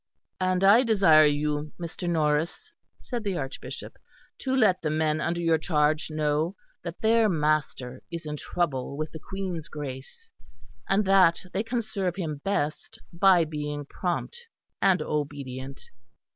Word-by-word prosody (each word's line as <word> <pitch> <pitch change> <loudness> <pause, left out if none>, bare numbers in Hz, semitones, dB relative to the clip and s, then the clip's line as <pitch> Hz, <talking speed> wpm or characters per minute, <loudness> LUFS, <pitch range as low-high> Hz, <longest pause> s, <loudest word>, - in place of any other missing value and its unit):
"And 185 0 +1
I 205 +5 +7
desire 195 - +6
you, 150 +1 -1
Mr. 175 +1 -4
Norris," 160 - 0 0.3
said 240 -3 -4
the 195 -4 -1
Archbishop, 135 -3 -7 0.4
"to 265 -1 -1
let 210 -8 +3
the 155 - -1
men 155 0 +1
under 170 +2 -1
your 165 -2 +2
charge 155 -1 +1
know 155 +3 0 0.3
that 170 0 -7
their 225 0 +4
master 150 -6 -1
is 170 -1 -6
in 150 0 -4
trouble 140 -4 -2
with 155 +1 -3
the 160 - -8
Queen's 180 -3 -5
Grace; 150 - -8 0.6
and 195 +2 +3
that 190 -2 +4
they 195 - +1
can 235 +1 -2
serve 195 -5 -2
him 160 -6 -3
best 155 -6 -2 0.2
by 175 -1 +5
being 150 -1 -4
prompt 195 - -4 0.3
and 185 -5 +3
obedient." 140 -3 -4
165 Hz, 145 wpm, -27 LUFS, 150-195 Hz, 0.6 s, I